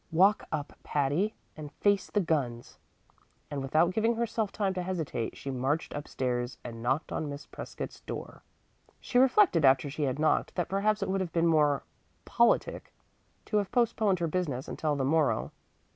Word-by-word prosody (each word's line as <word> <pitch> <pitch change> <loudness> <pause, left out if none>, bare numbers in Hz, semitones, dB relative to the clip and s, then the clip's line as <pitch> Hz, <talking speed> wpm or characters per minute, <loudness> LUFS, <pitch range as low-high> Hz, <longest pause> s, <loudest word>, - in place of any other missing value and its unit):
"Walk 195 +6 +4
up, 150 -2 -3
Patty, 150 +9 0 0.2
and 150 -2 -8
face 200 -1 +1
the 210 - +1
guns"; 130 -9 -2 0.7
and 140 -1 -3
without 155 +6 +2
giving 225 +3 +2
herself 225 -3 -1
time 200 -3 -1
to 185 - -2
hesitate 165 -10 -3
she 140 - -5
marched 135 +5 -1
up 145 0 -5
stairs 125 -1 -2
and 115 -2 -7
knocked 130 +6 -1
on 155 - -2
Miss 140 +1 -7
Prescott's - - -7
door. - - -7 0.6
She 245 - +1
reflected 265 - +5
after 135 +1 +4
she 150 - -5
had 130 -1 -1
knocked 155 +1 +1
that 175 -3 -1
perhaps 205 +2 +1
it 195 - -3
would 195 0 0
have 180 -3 -3
been 165 0 +2
more 150 -4 +3 0.4
politic 235 0 +1 0.5
to 210 - 0
have 205 -2 -1
postponed 220 -5 +2
her 170 -1 -1
business 150 -7 -2
until 150 -2 -1
the 135 -2 -1
morrow. 155 +1 +1
160 Hz, 175 wpm, -29 LUFS, 140-200 Hz, 0.7 s, reflected